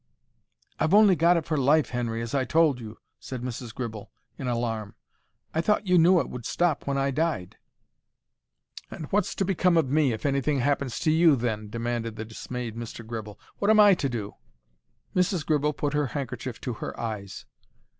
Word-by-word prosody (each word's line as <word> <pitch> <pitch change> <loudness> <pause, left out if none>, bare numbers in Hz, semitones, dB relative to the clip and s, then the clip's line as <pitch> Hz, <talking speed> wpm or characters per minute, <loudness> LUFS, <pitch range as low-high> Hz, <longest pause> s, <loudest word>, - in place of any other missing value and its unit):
"I've 165 +6 +3
only 205 -3 +7
got 170 +2 +4
it 160 - -2
for 155 - -1
life, 145 +3 +3
Henry, 115 -2 -2
as 115 - -6
I 135 -2 +2
told 155 -1 +3
you," 110 -1 -9 0.2
said 125 -2 -7
Mrs. 125 -1 -5
Gribble, 110 -3 -6 0.3
in 135 - -5
alarm. 115 -3 -2 0.6
"I 160 - +1
thought 210 +3 +1
you 180 -2 +4
knew 175 +2 +6
it - - -1
would 125 -1 -7
stop 170 +3 0
when 140 0 0
I 135 0 +1
died." 150 - -2 1.3
"And 155 - -7
what's 205 +2 +1
to 195 - 0
become 180 -2 +2
of 140 -5 +1
me 150 -3 +3
if 110 - -5
anything 140 0 +1
happens 140 -2 0
to 155 - +2
you, 160 -1 +5
then?" 110 -4 -3
demanded 115 0 -3
the 110 - -5
dismayed 115 +1 -6
Mr. 115 0 -7
Gribble. 110 -2 -7 0.2
"What 200 - +1
am 220 0 +6
I 205 -1 +8
to 145 -6 -1
do?" 105 -4 -4 0.8
Mrs. 180 -3 +1
Gribble 150 -1 +1
put 145 0 -2
her 150 -1 +1
handkerchief 130 -2 -5
to 125 - -3
her - - -5
eyes. 105 -4 -5
135 Hz, 185 wpm, -26 LUFS, 115-160 Hz, 1.3 s, I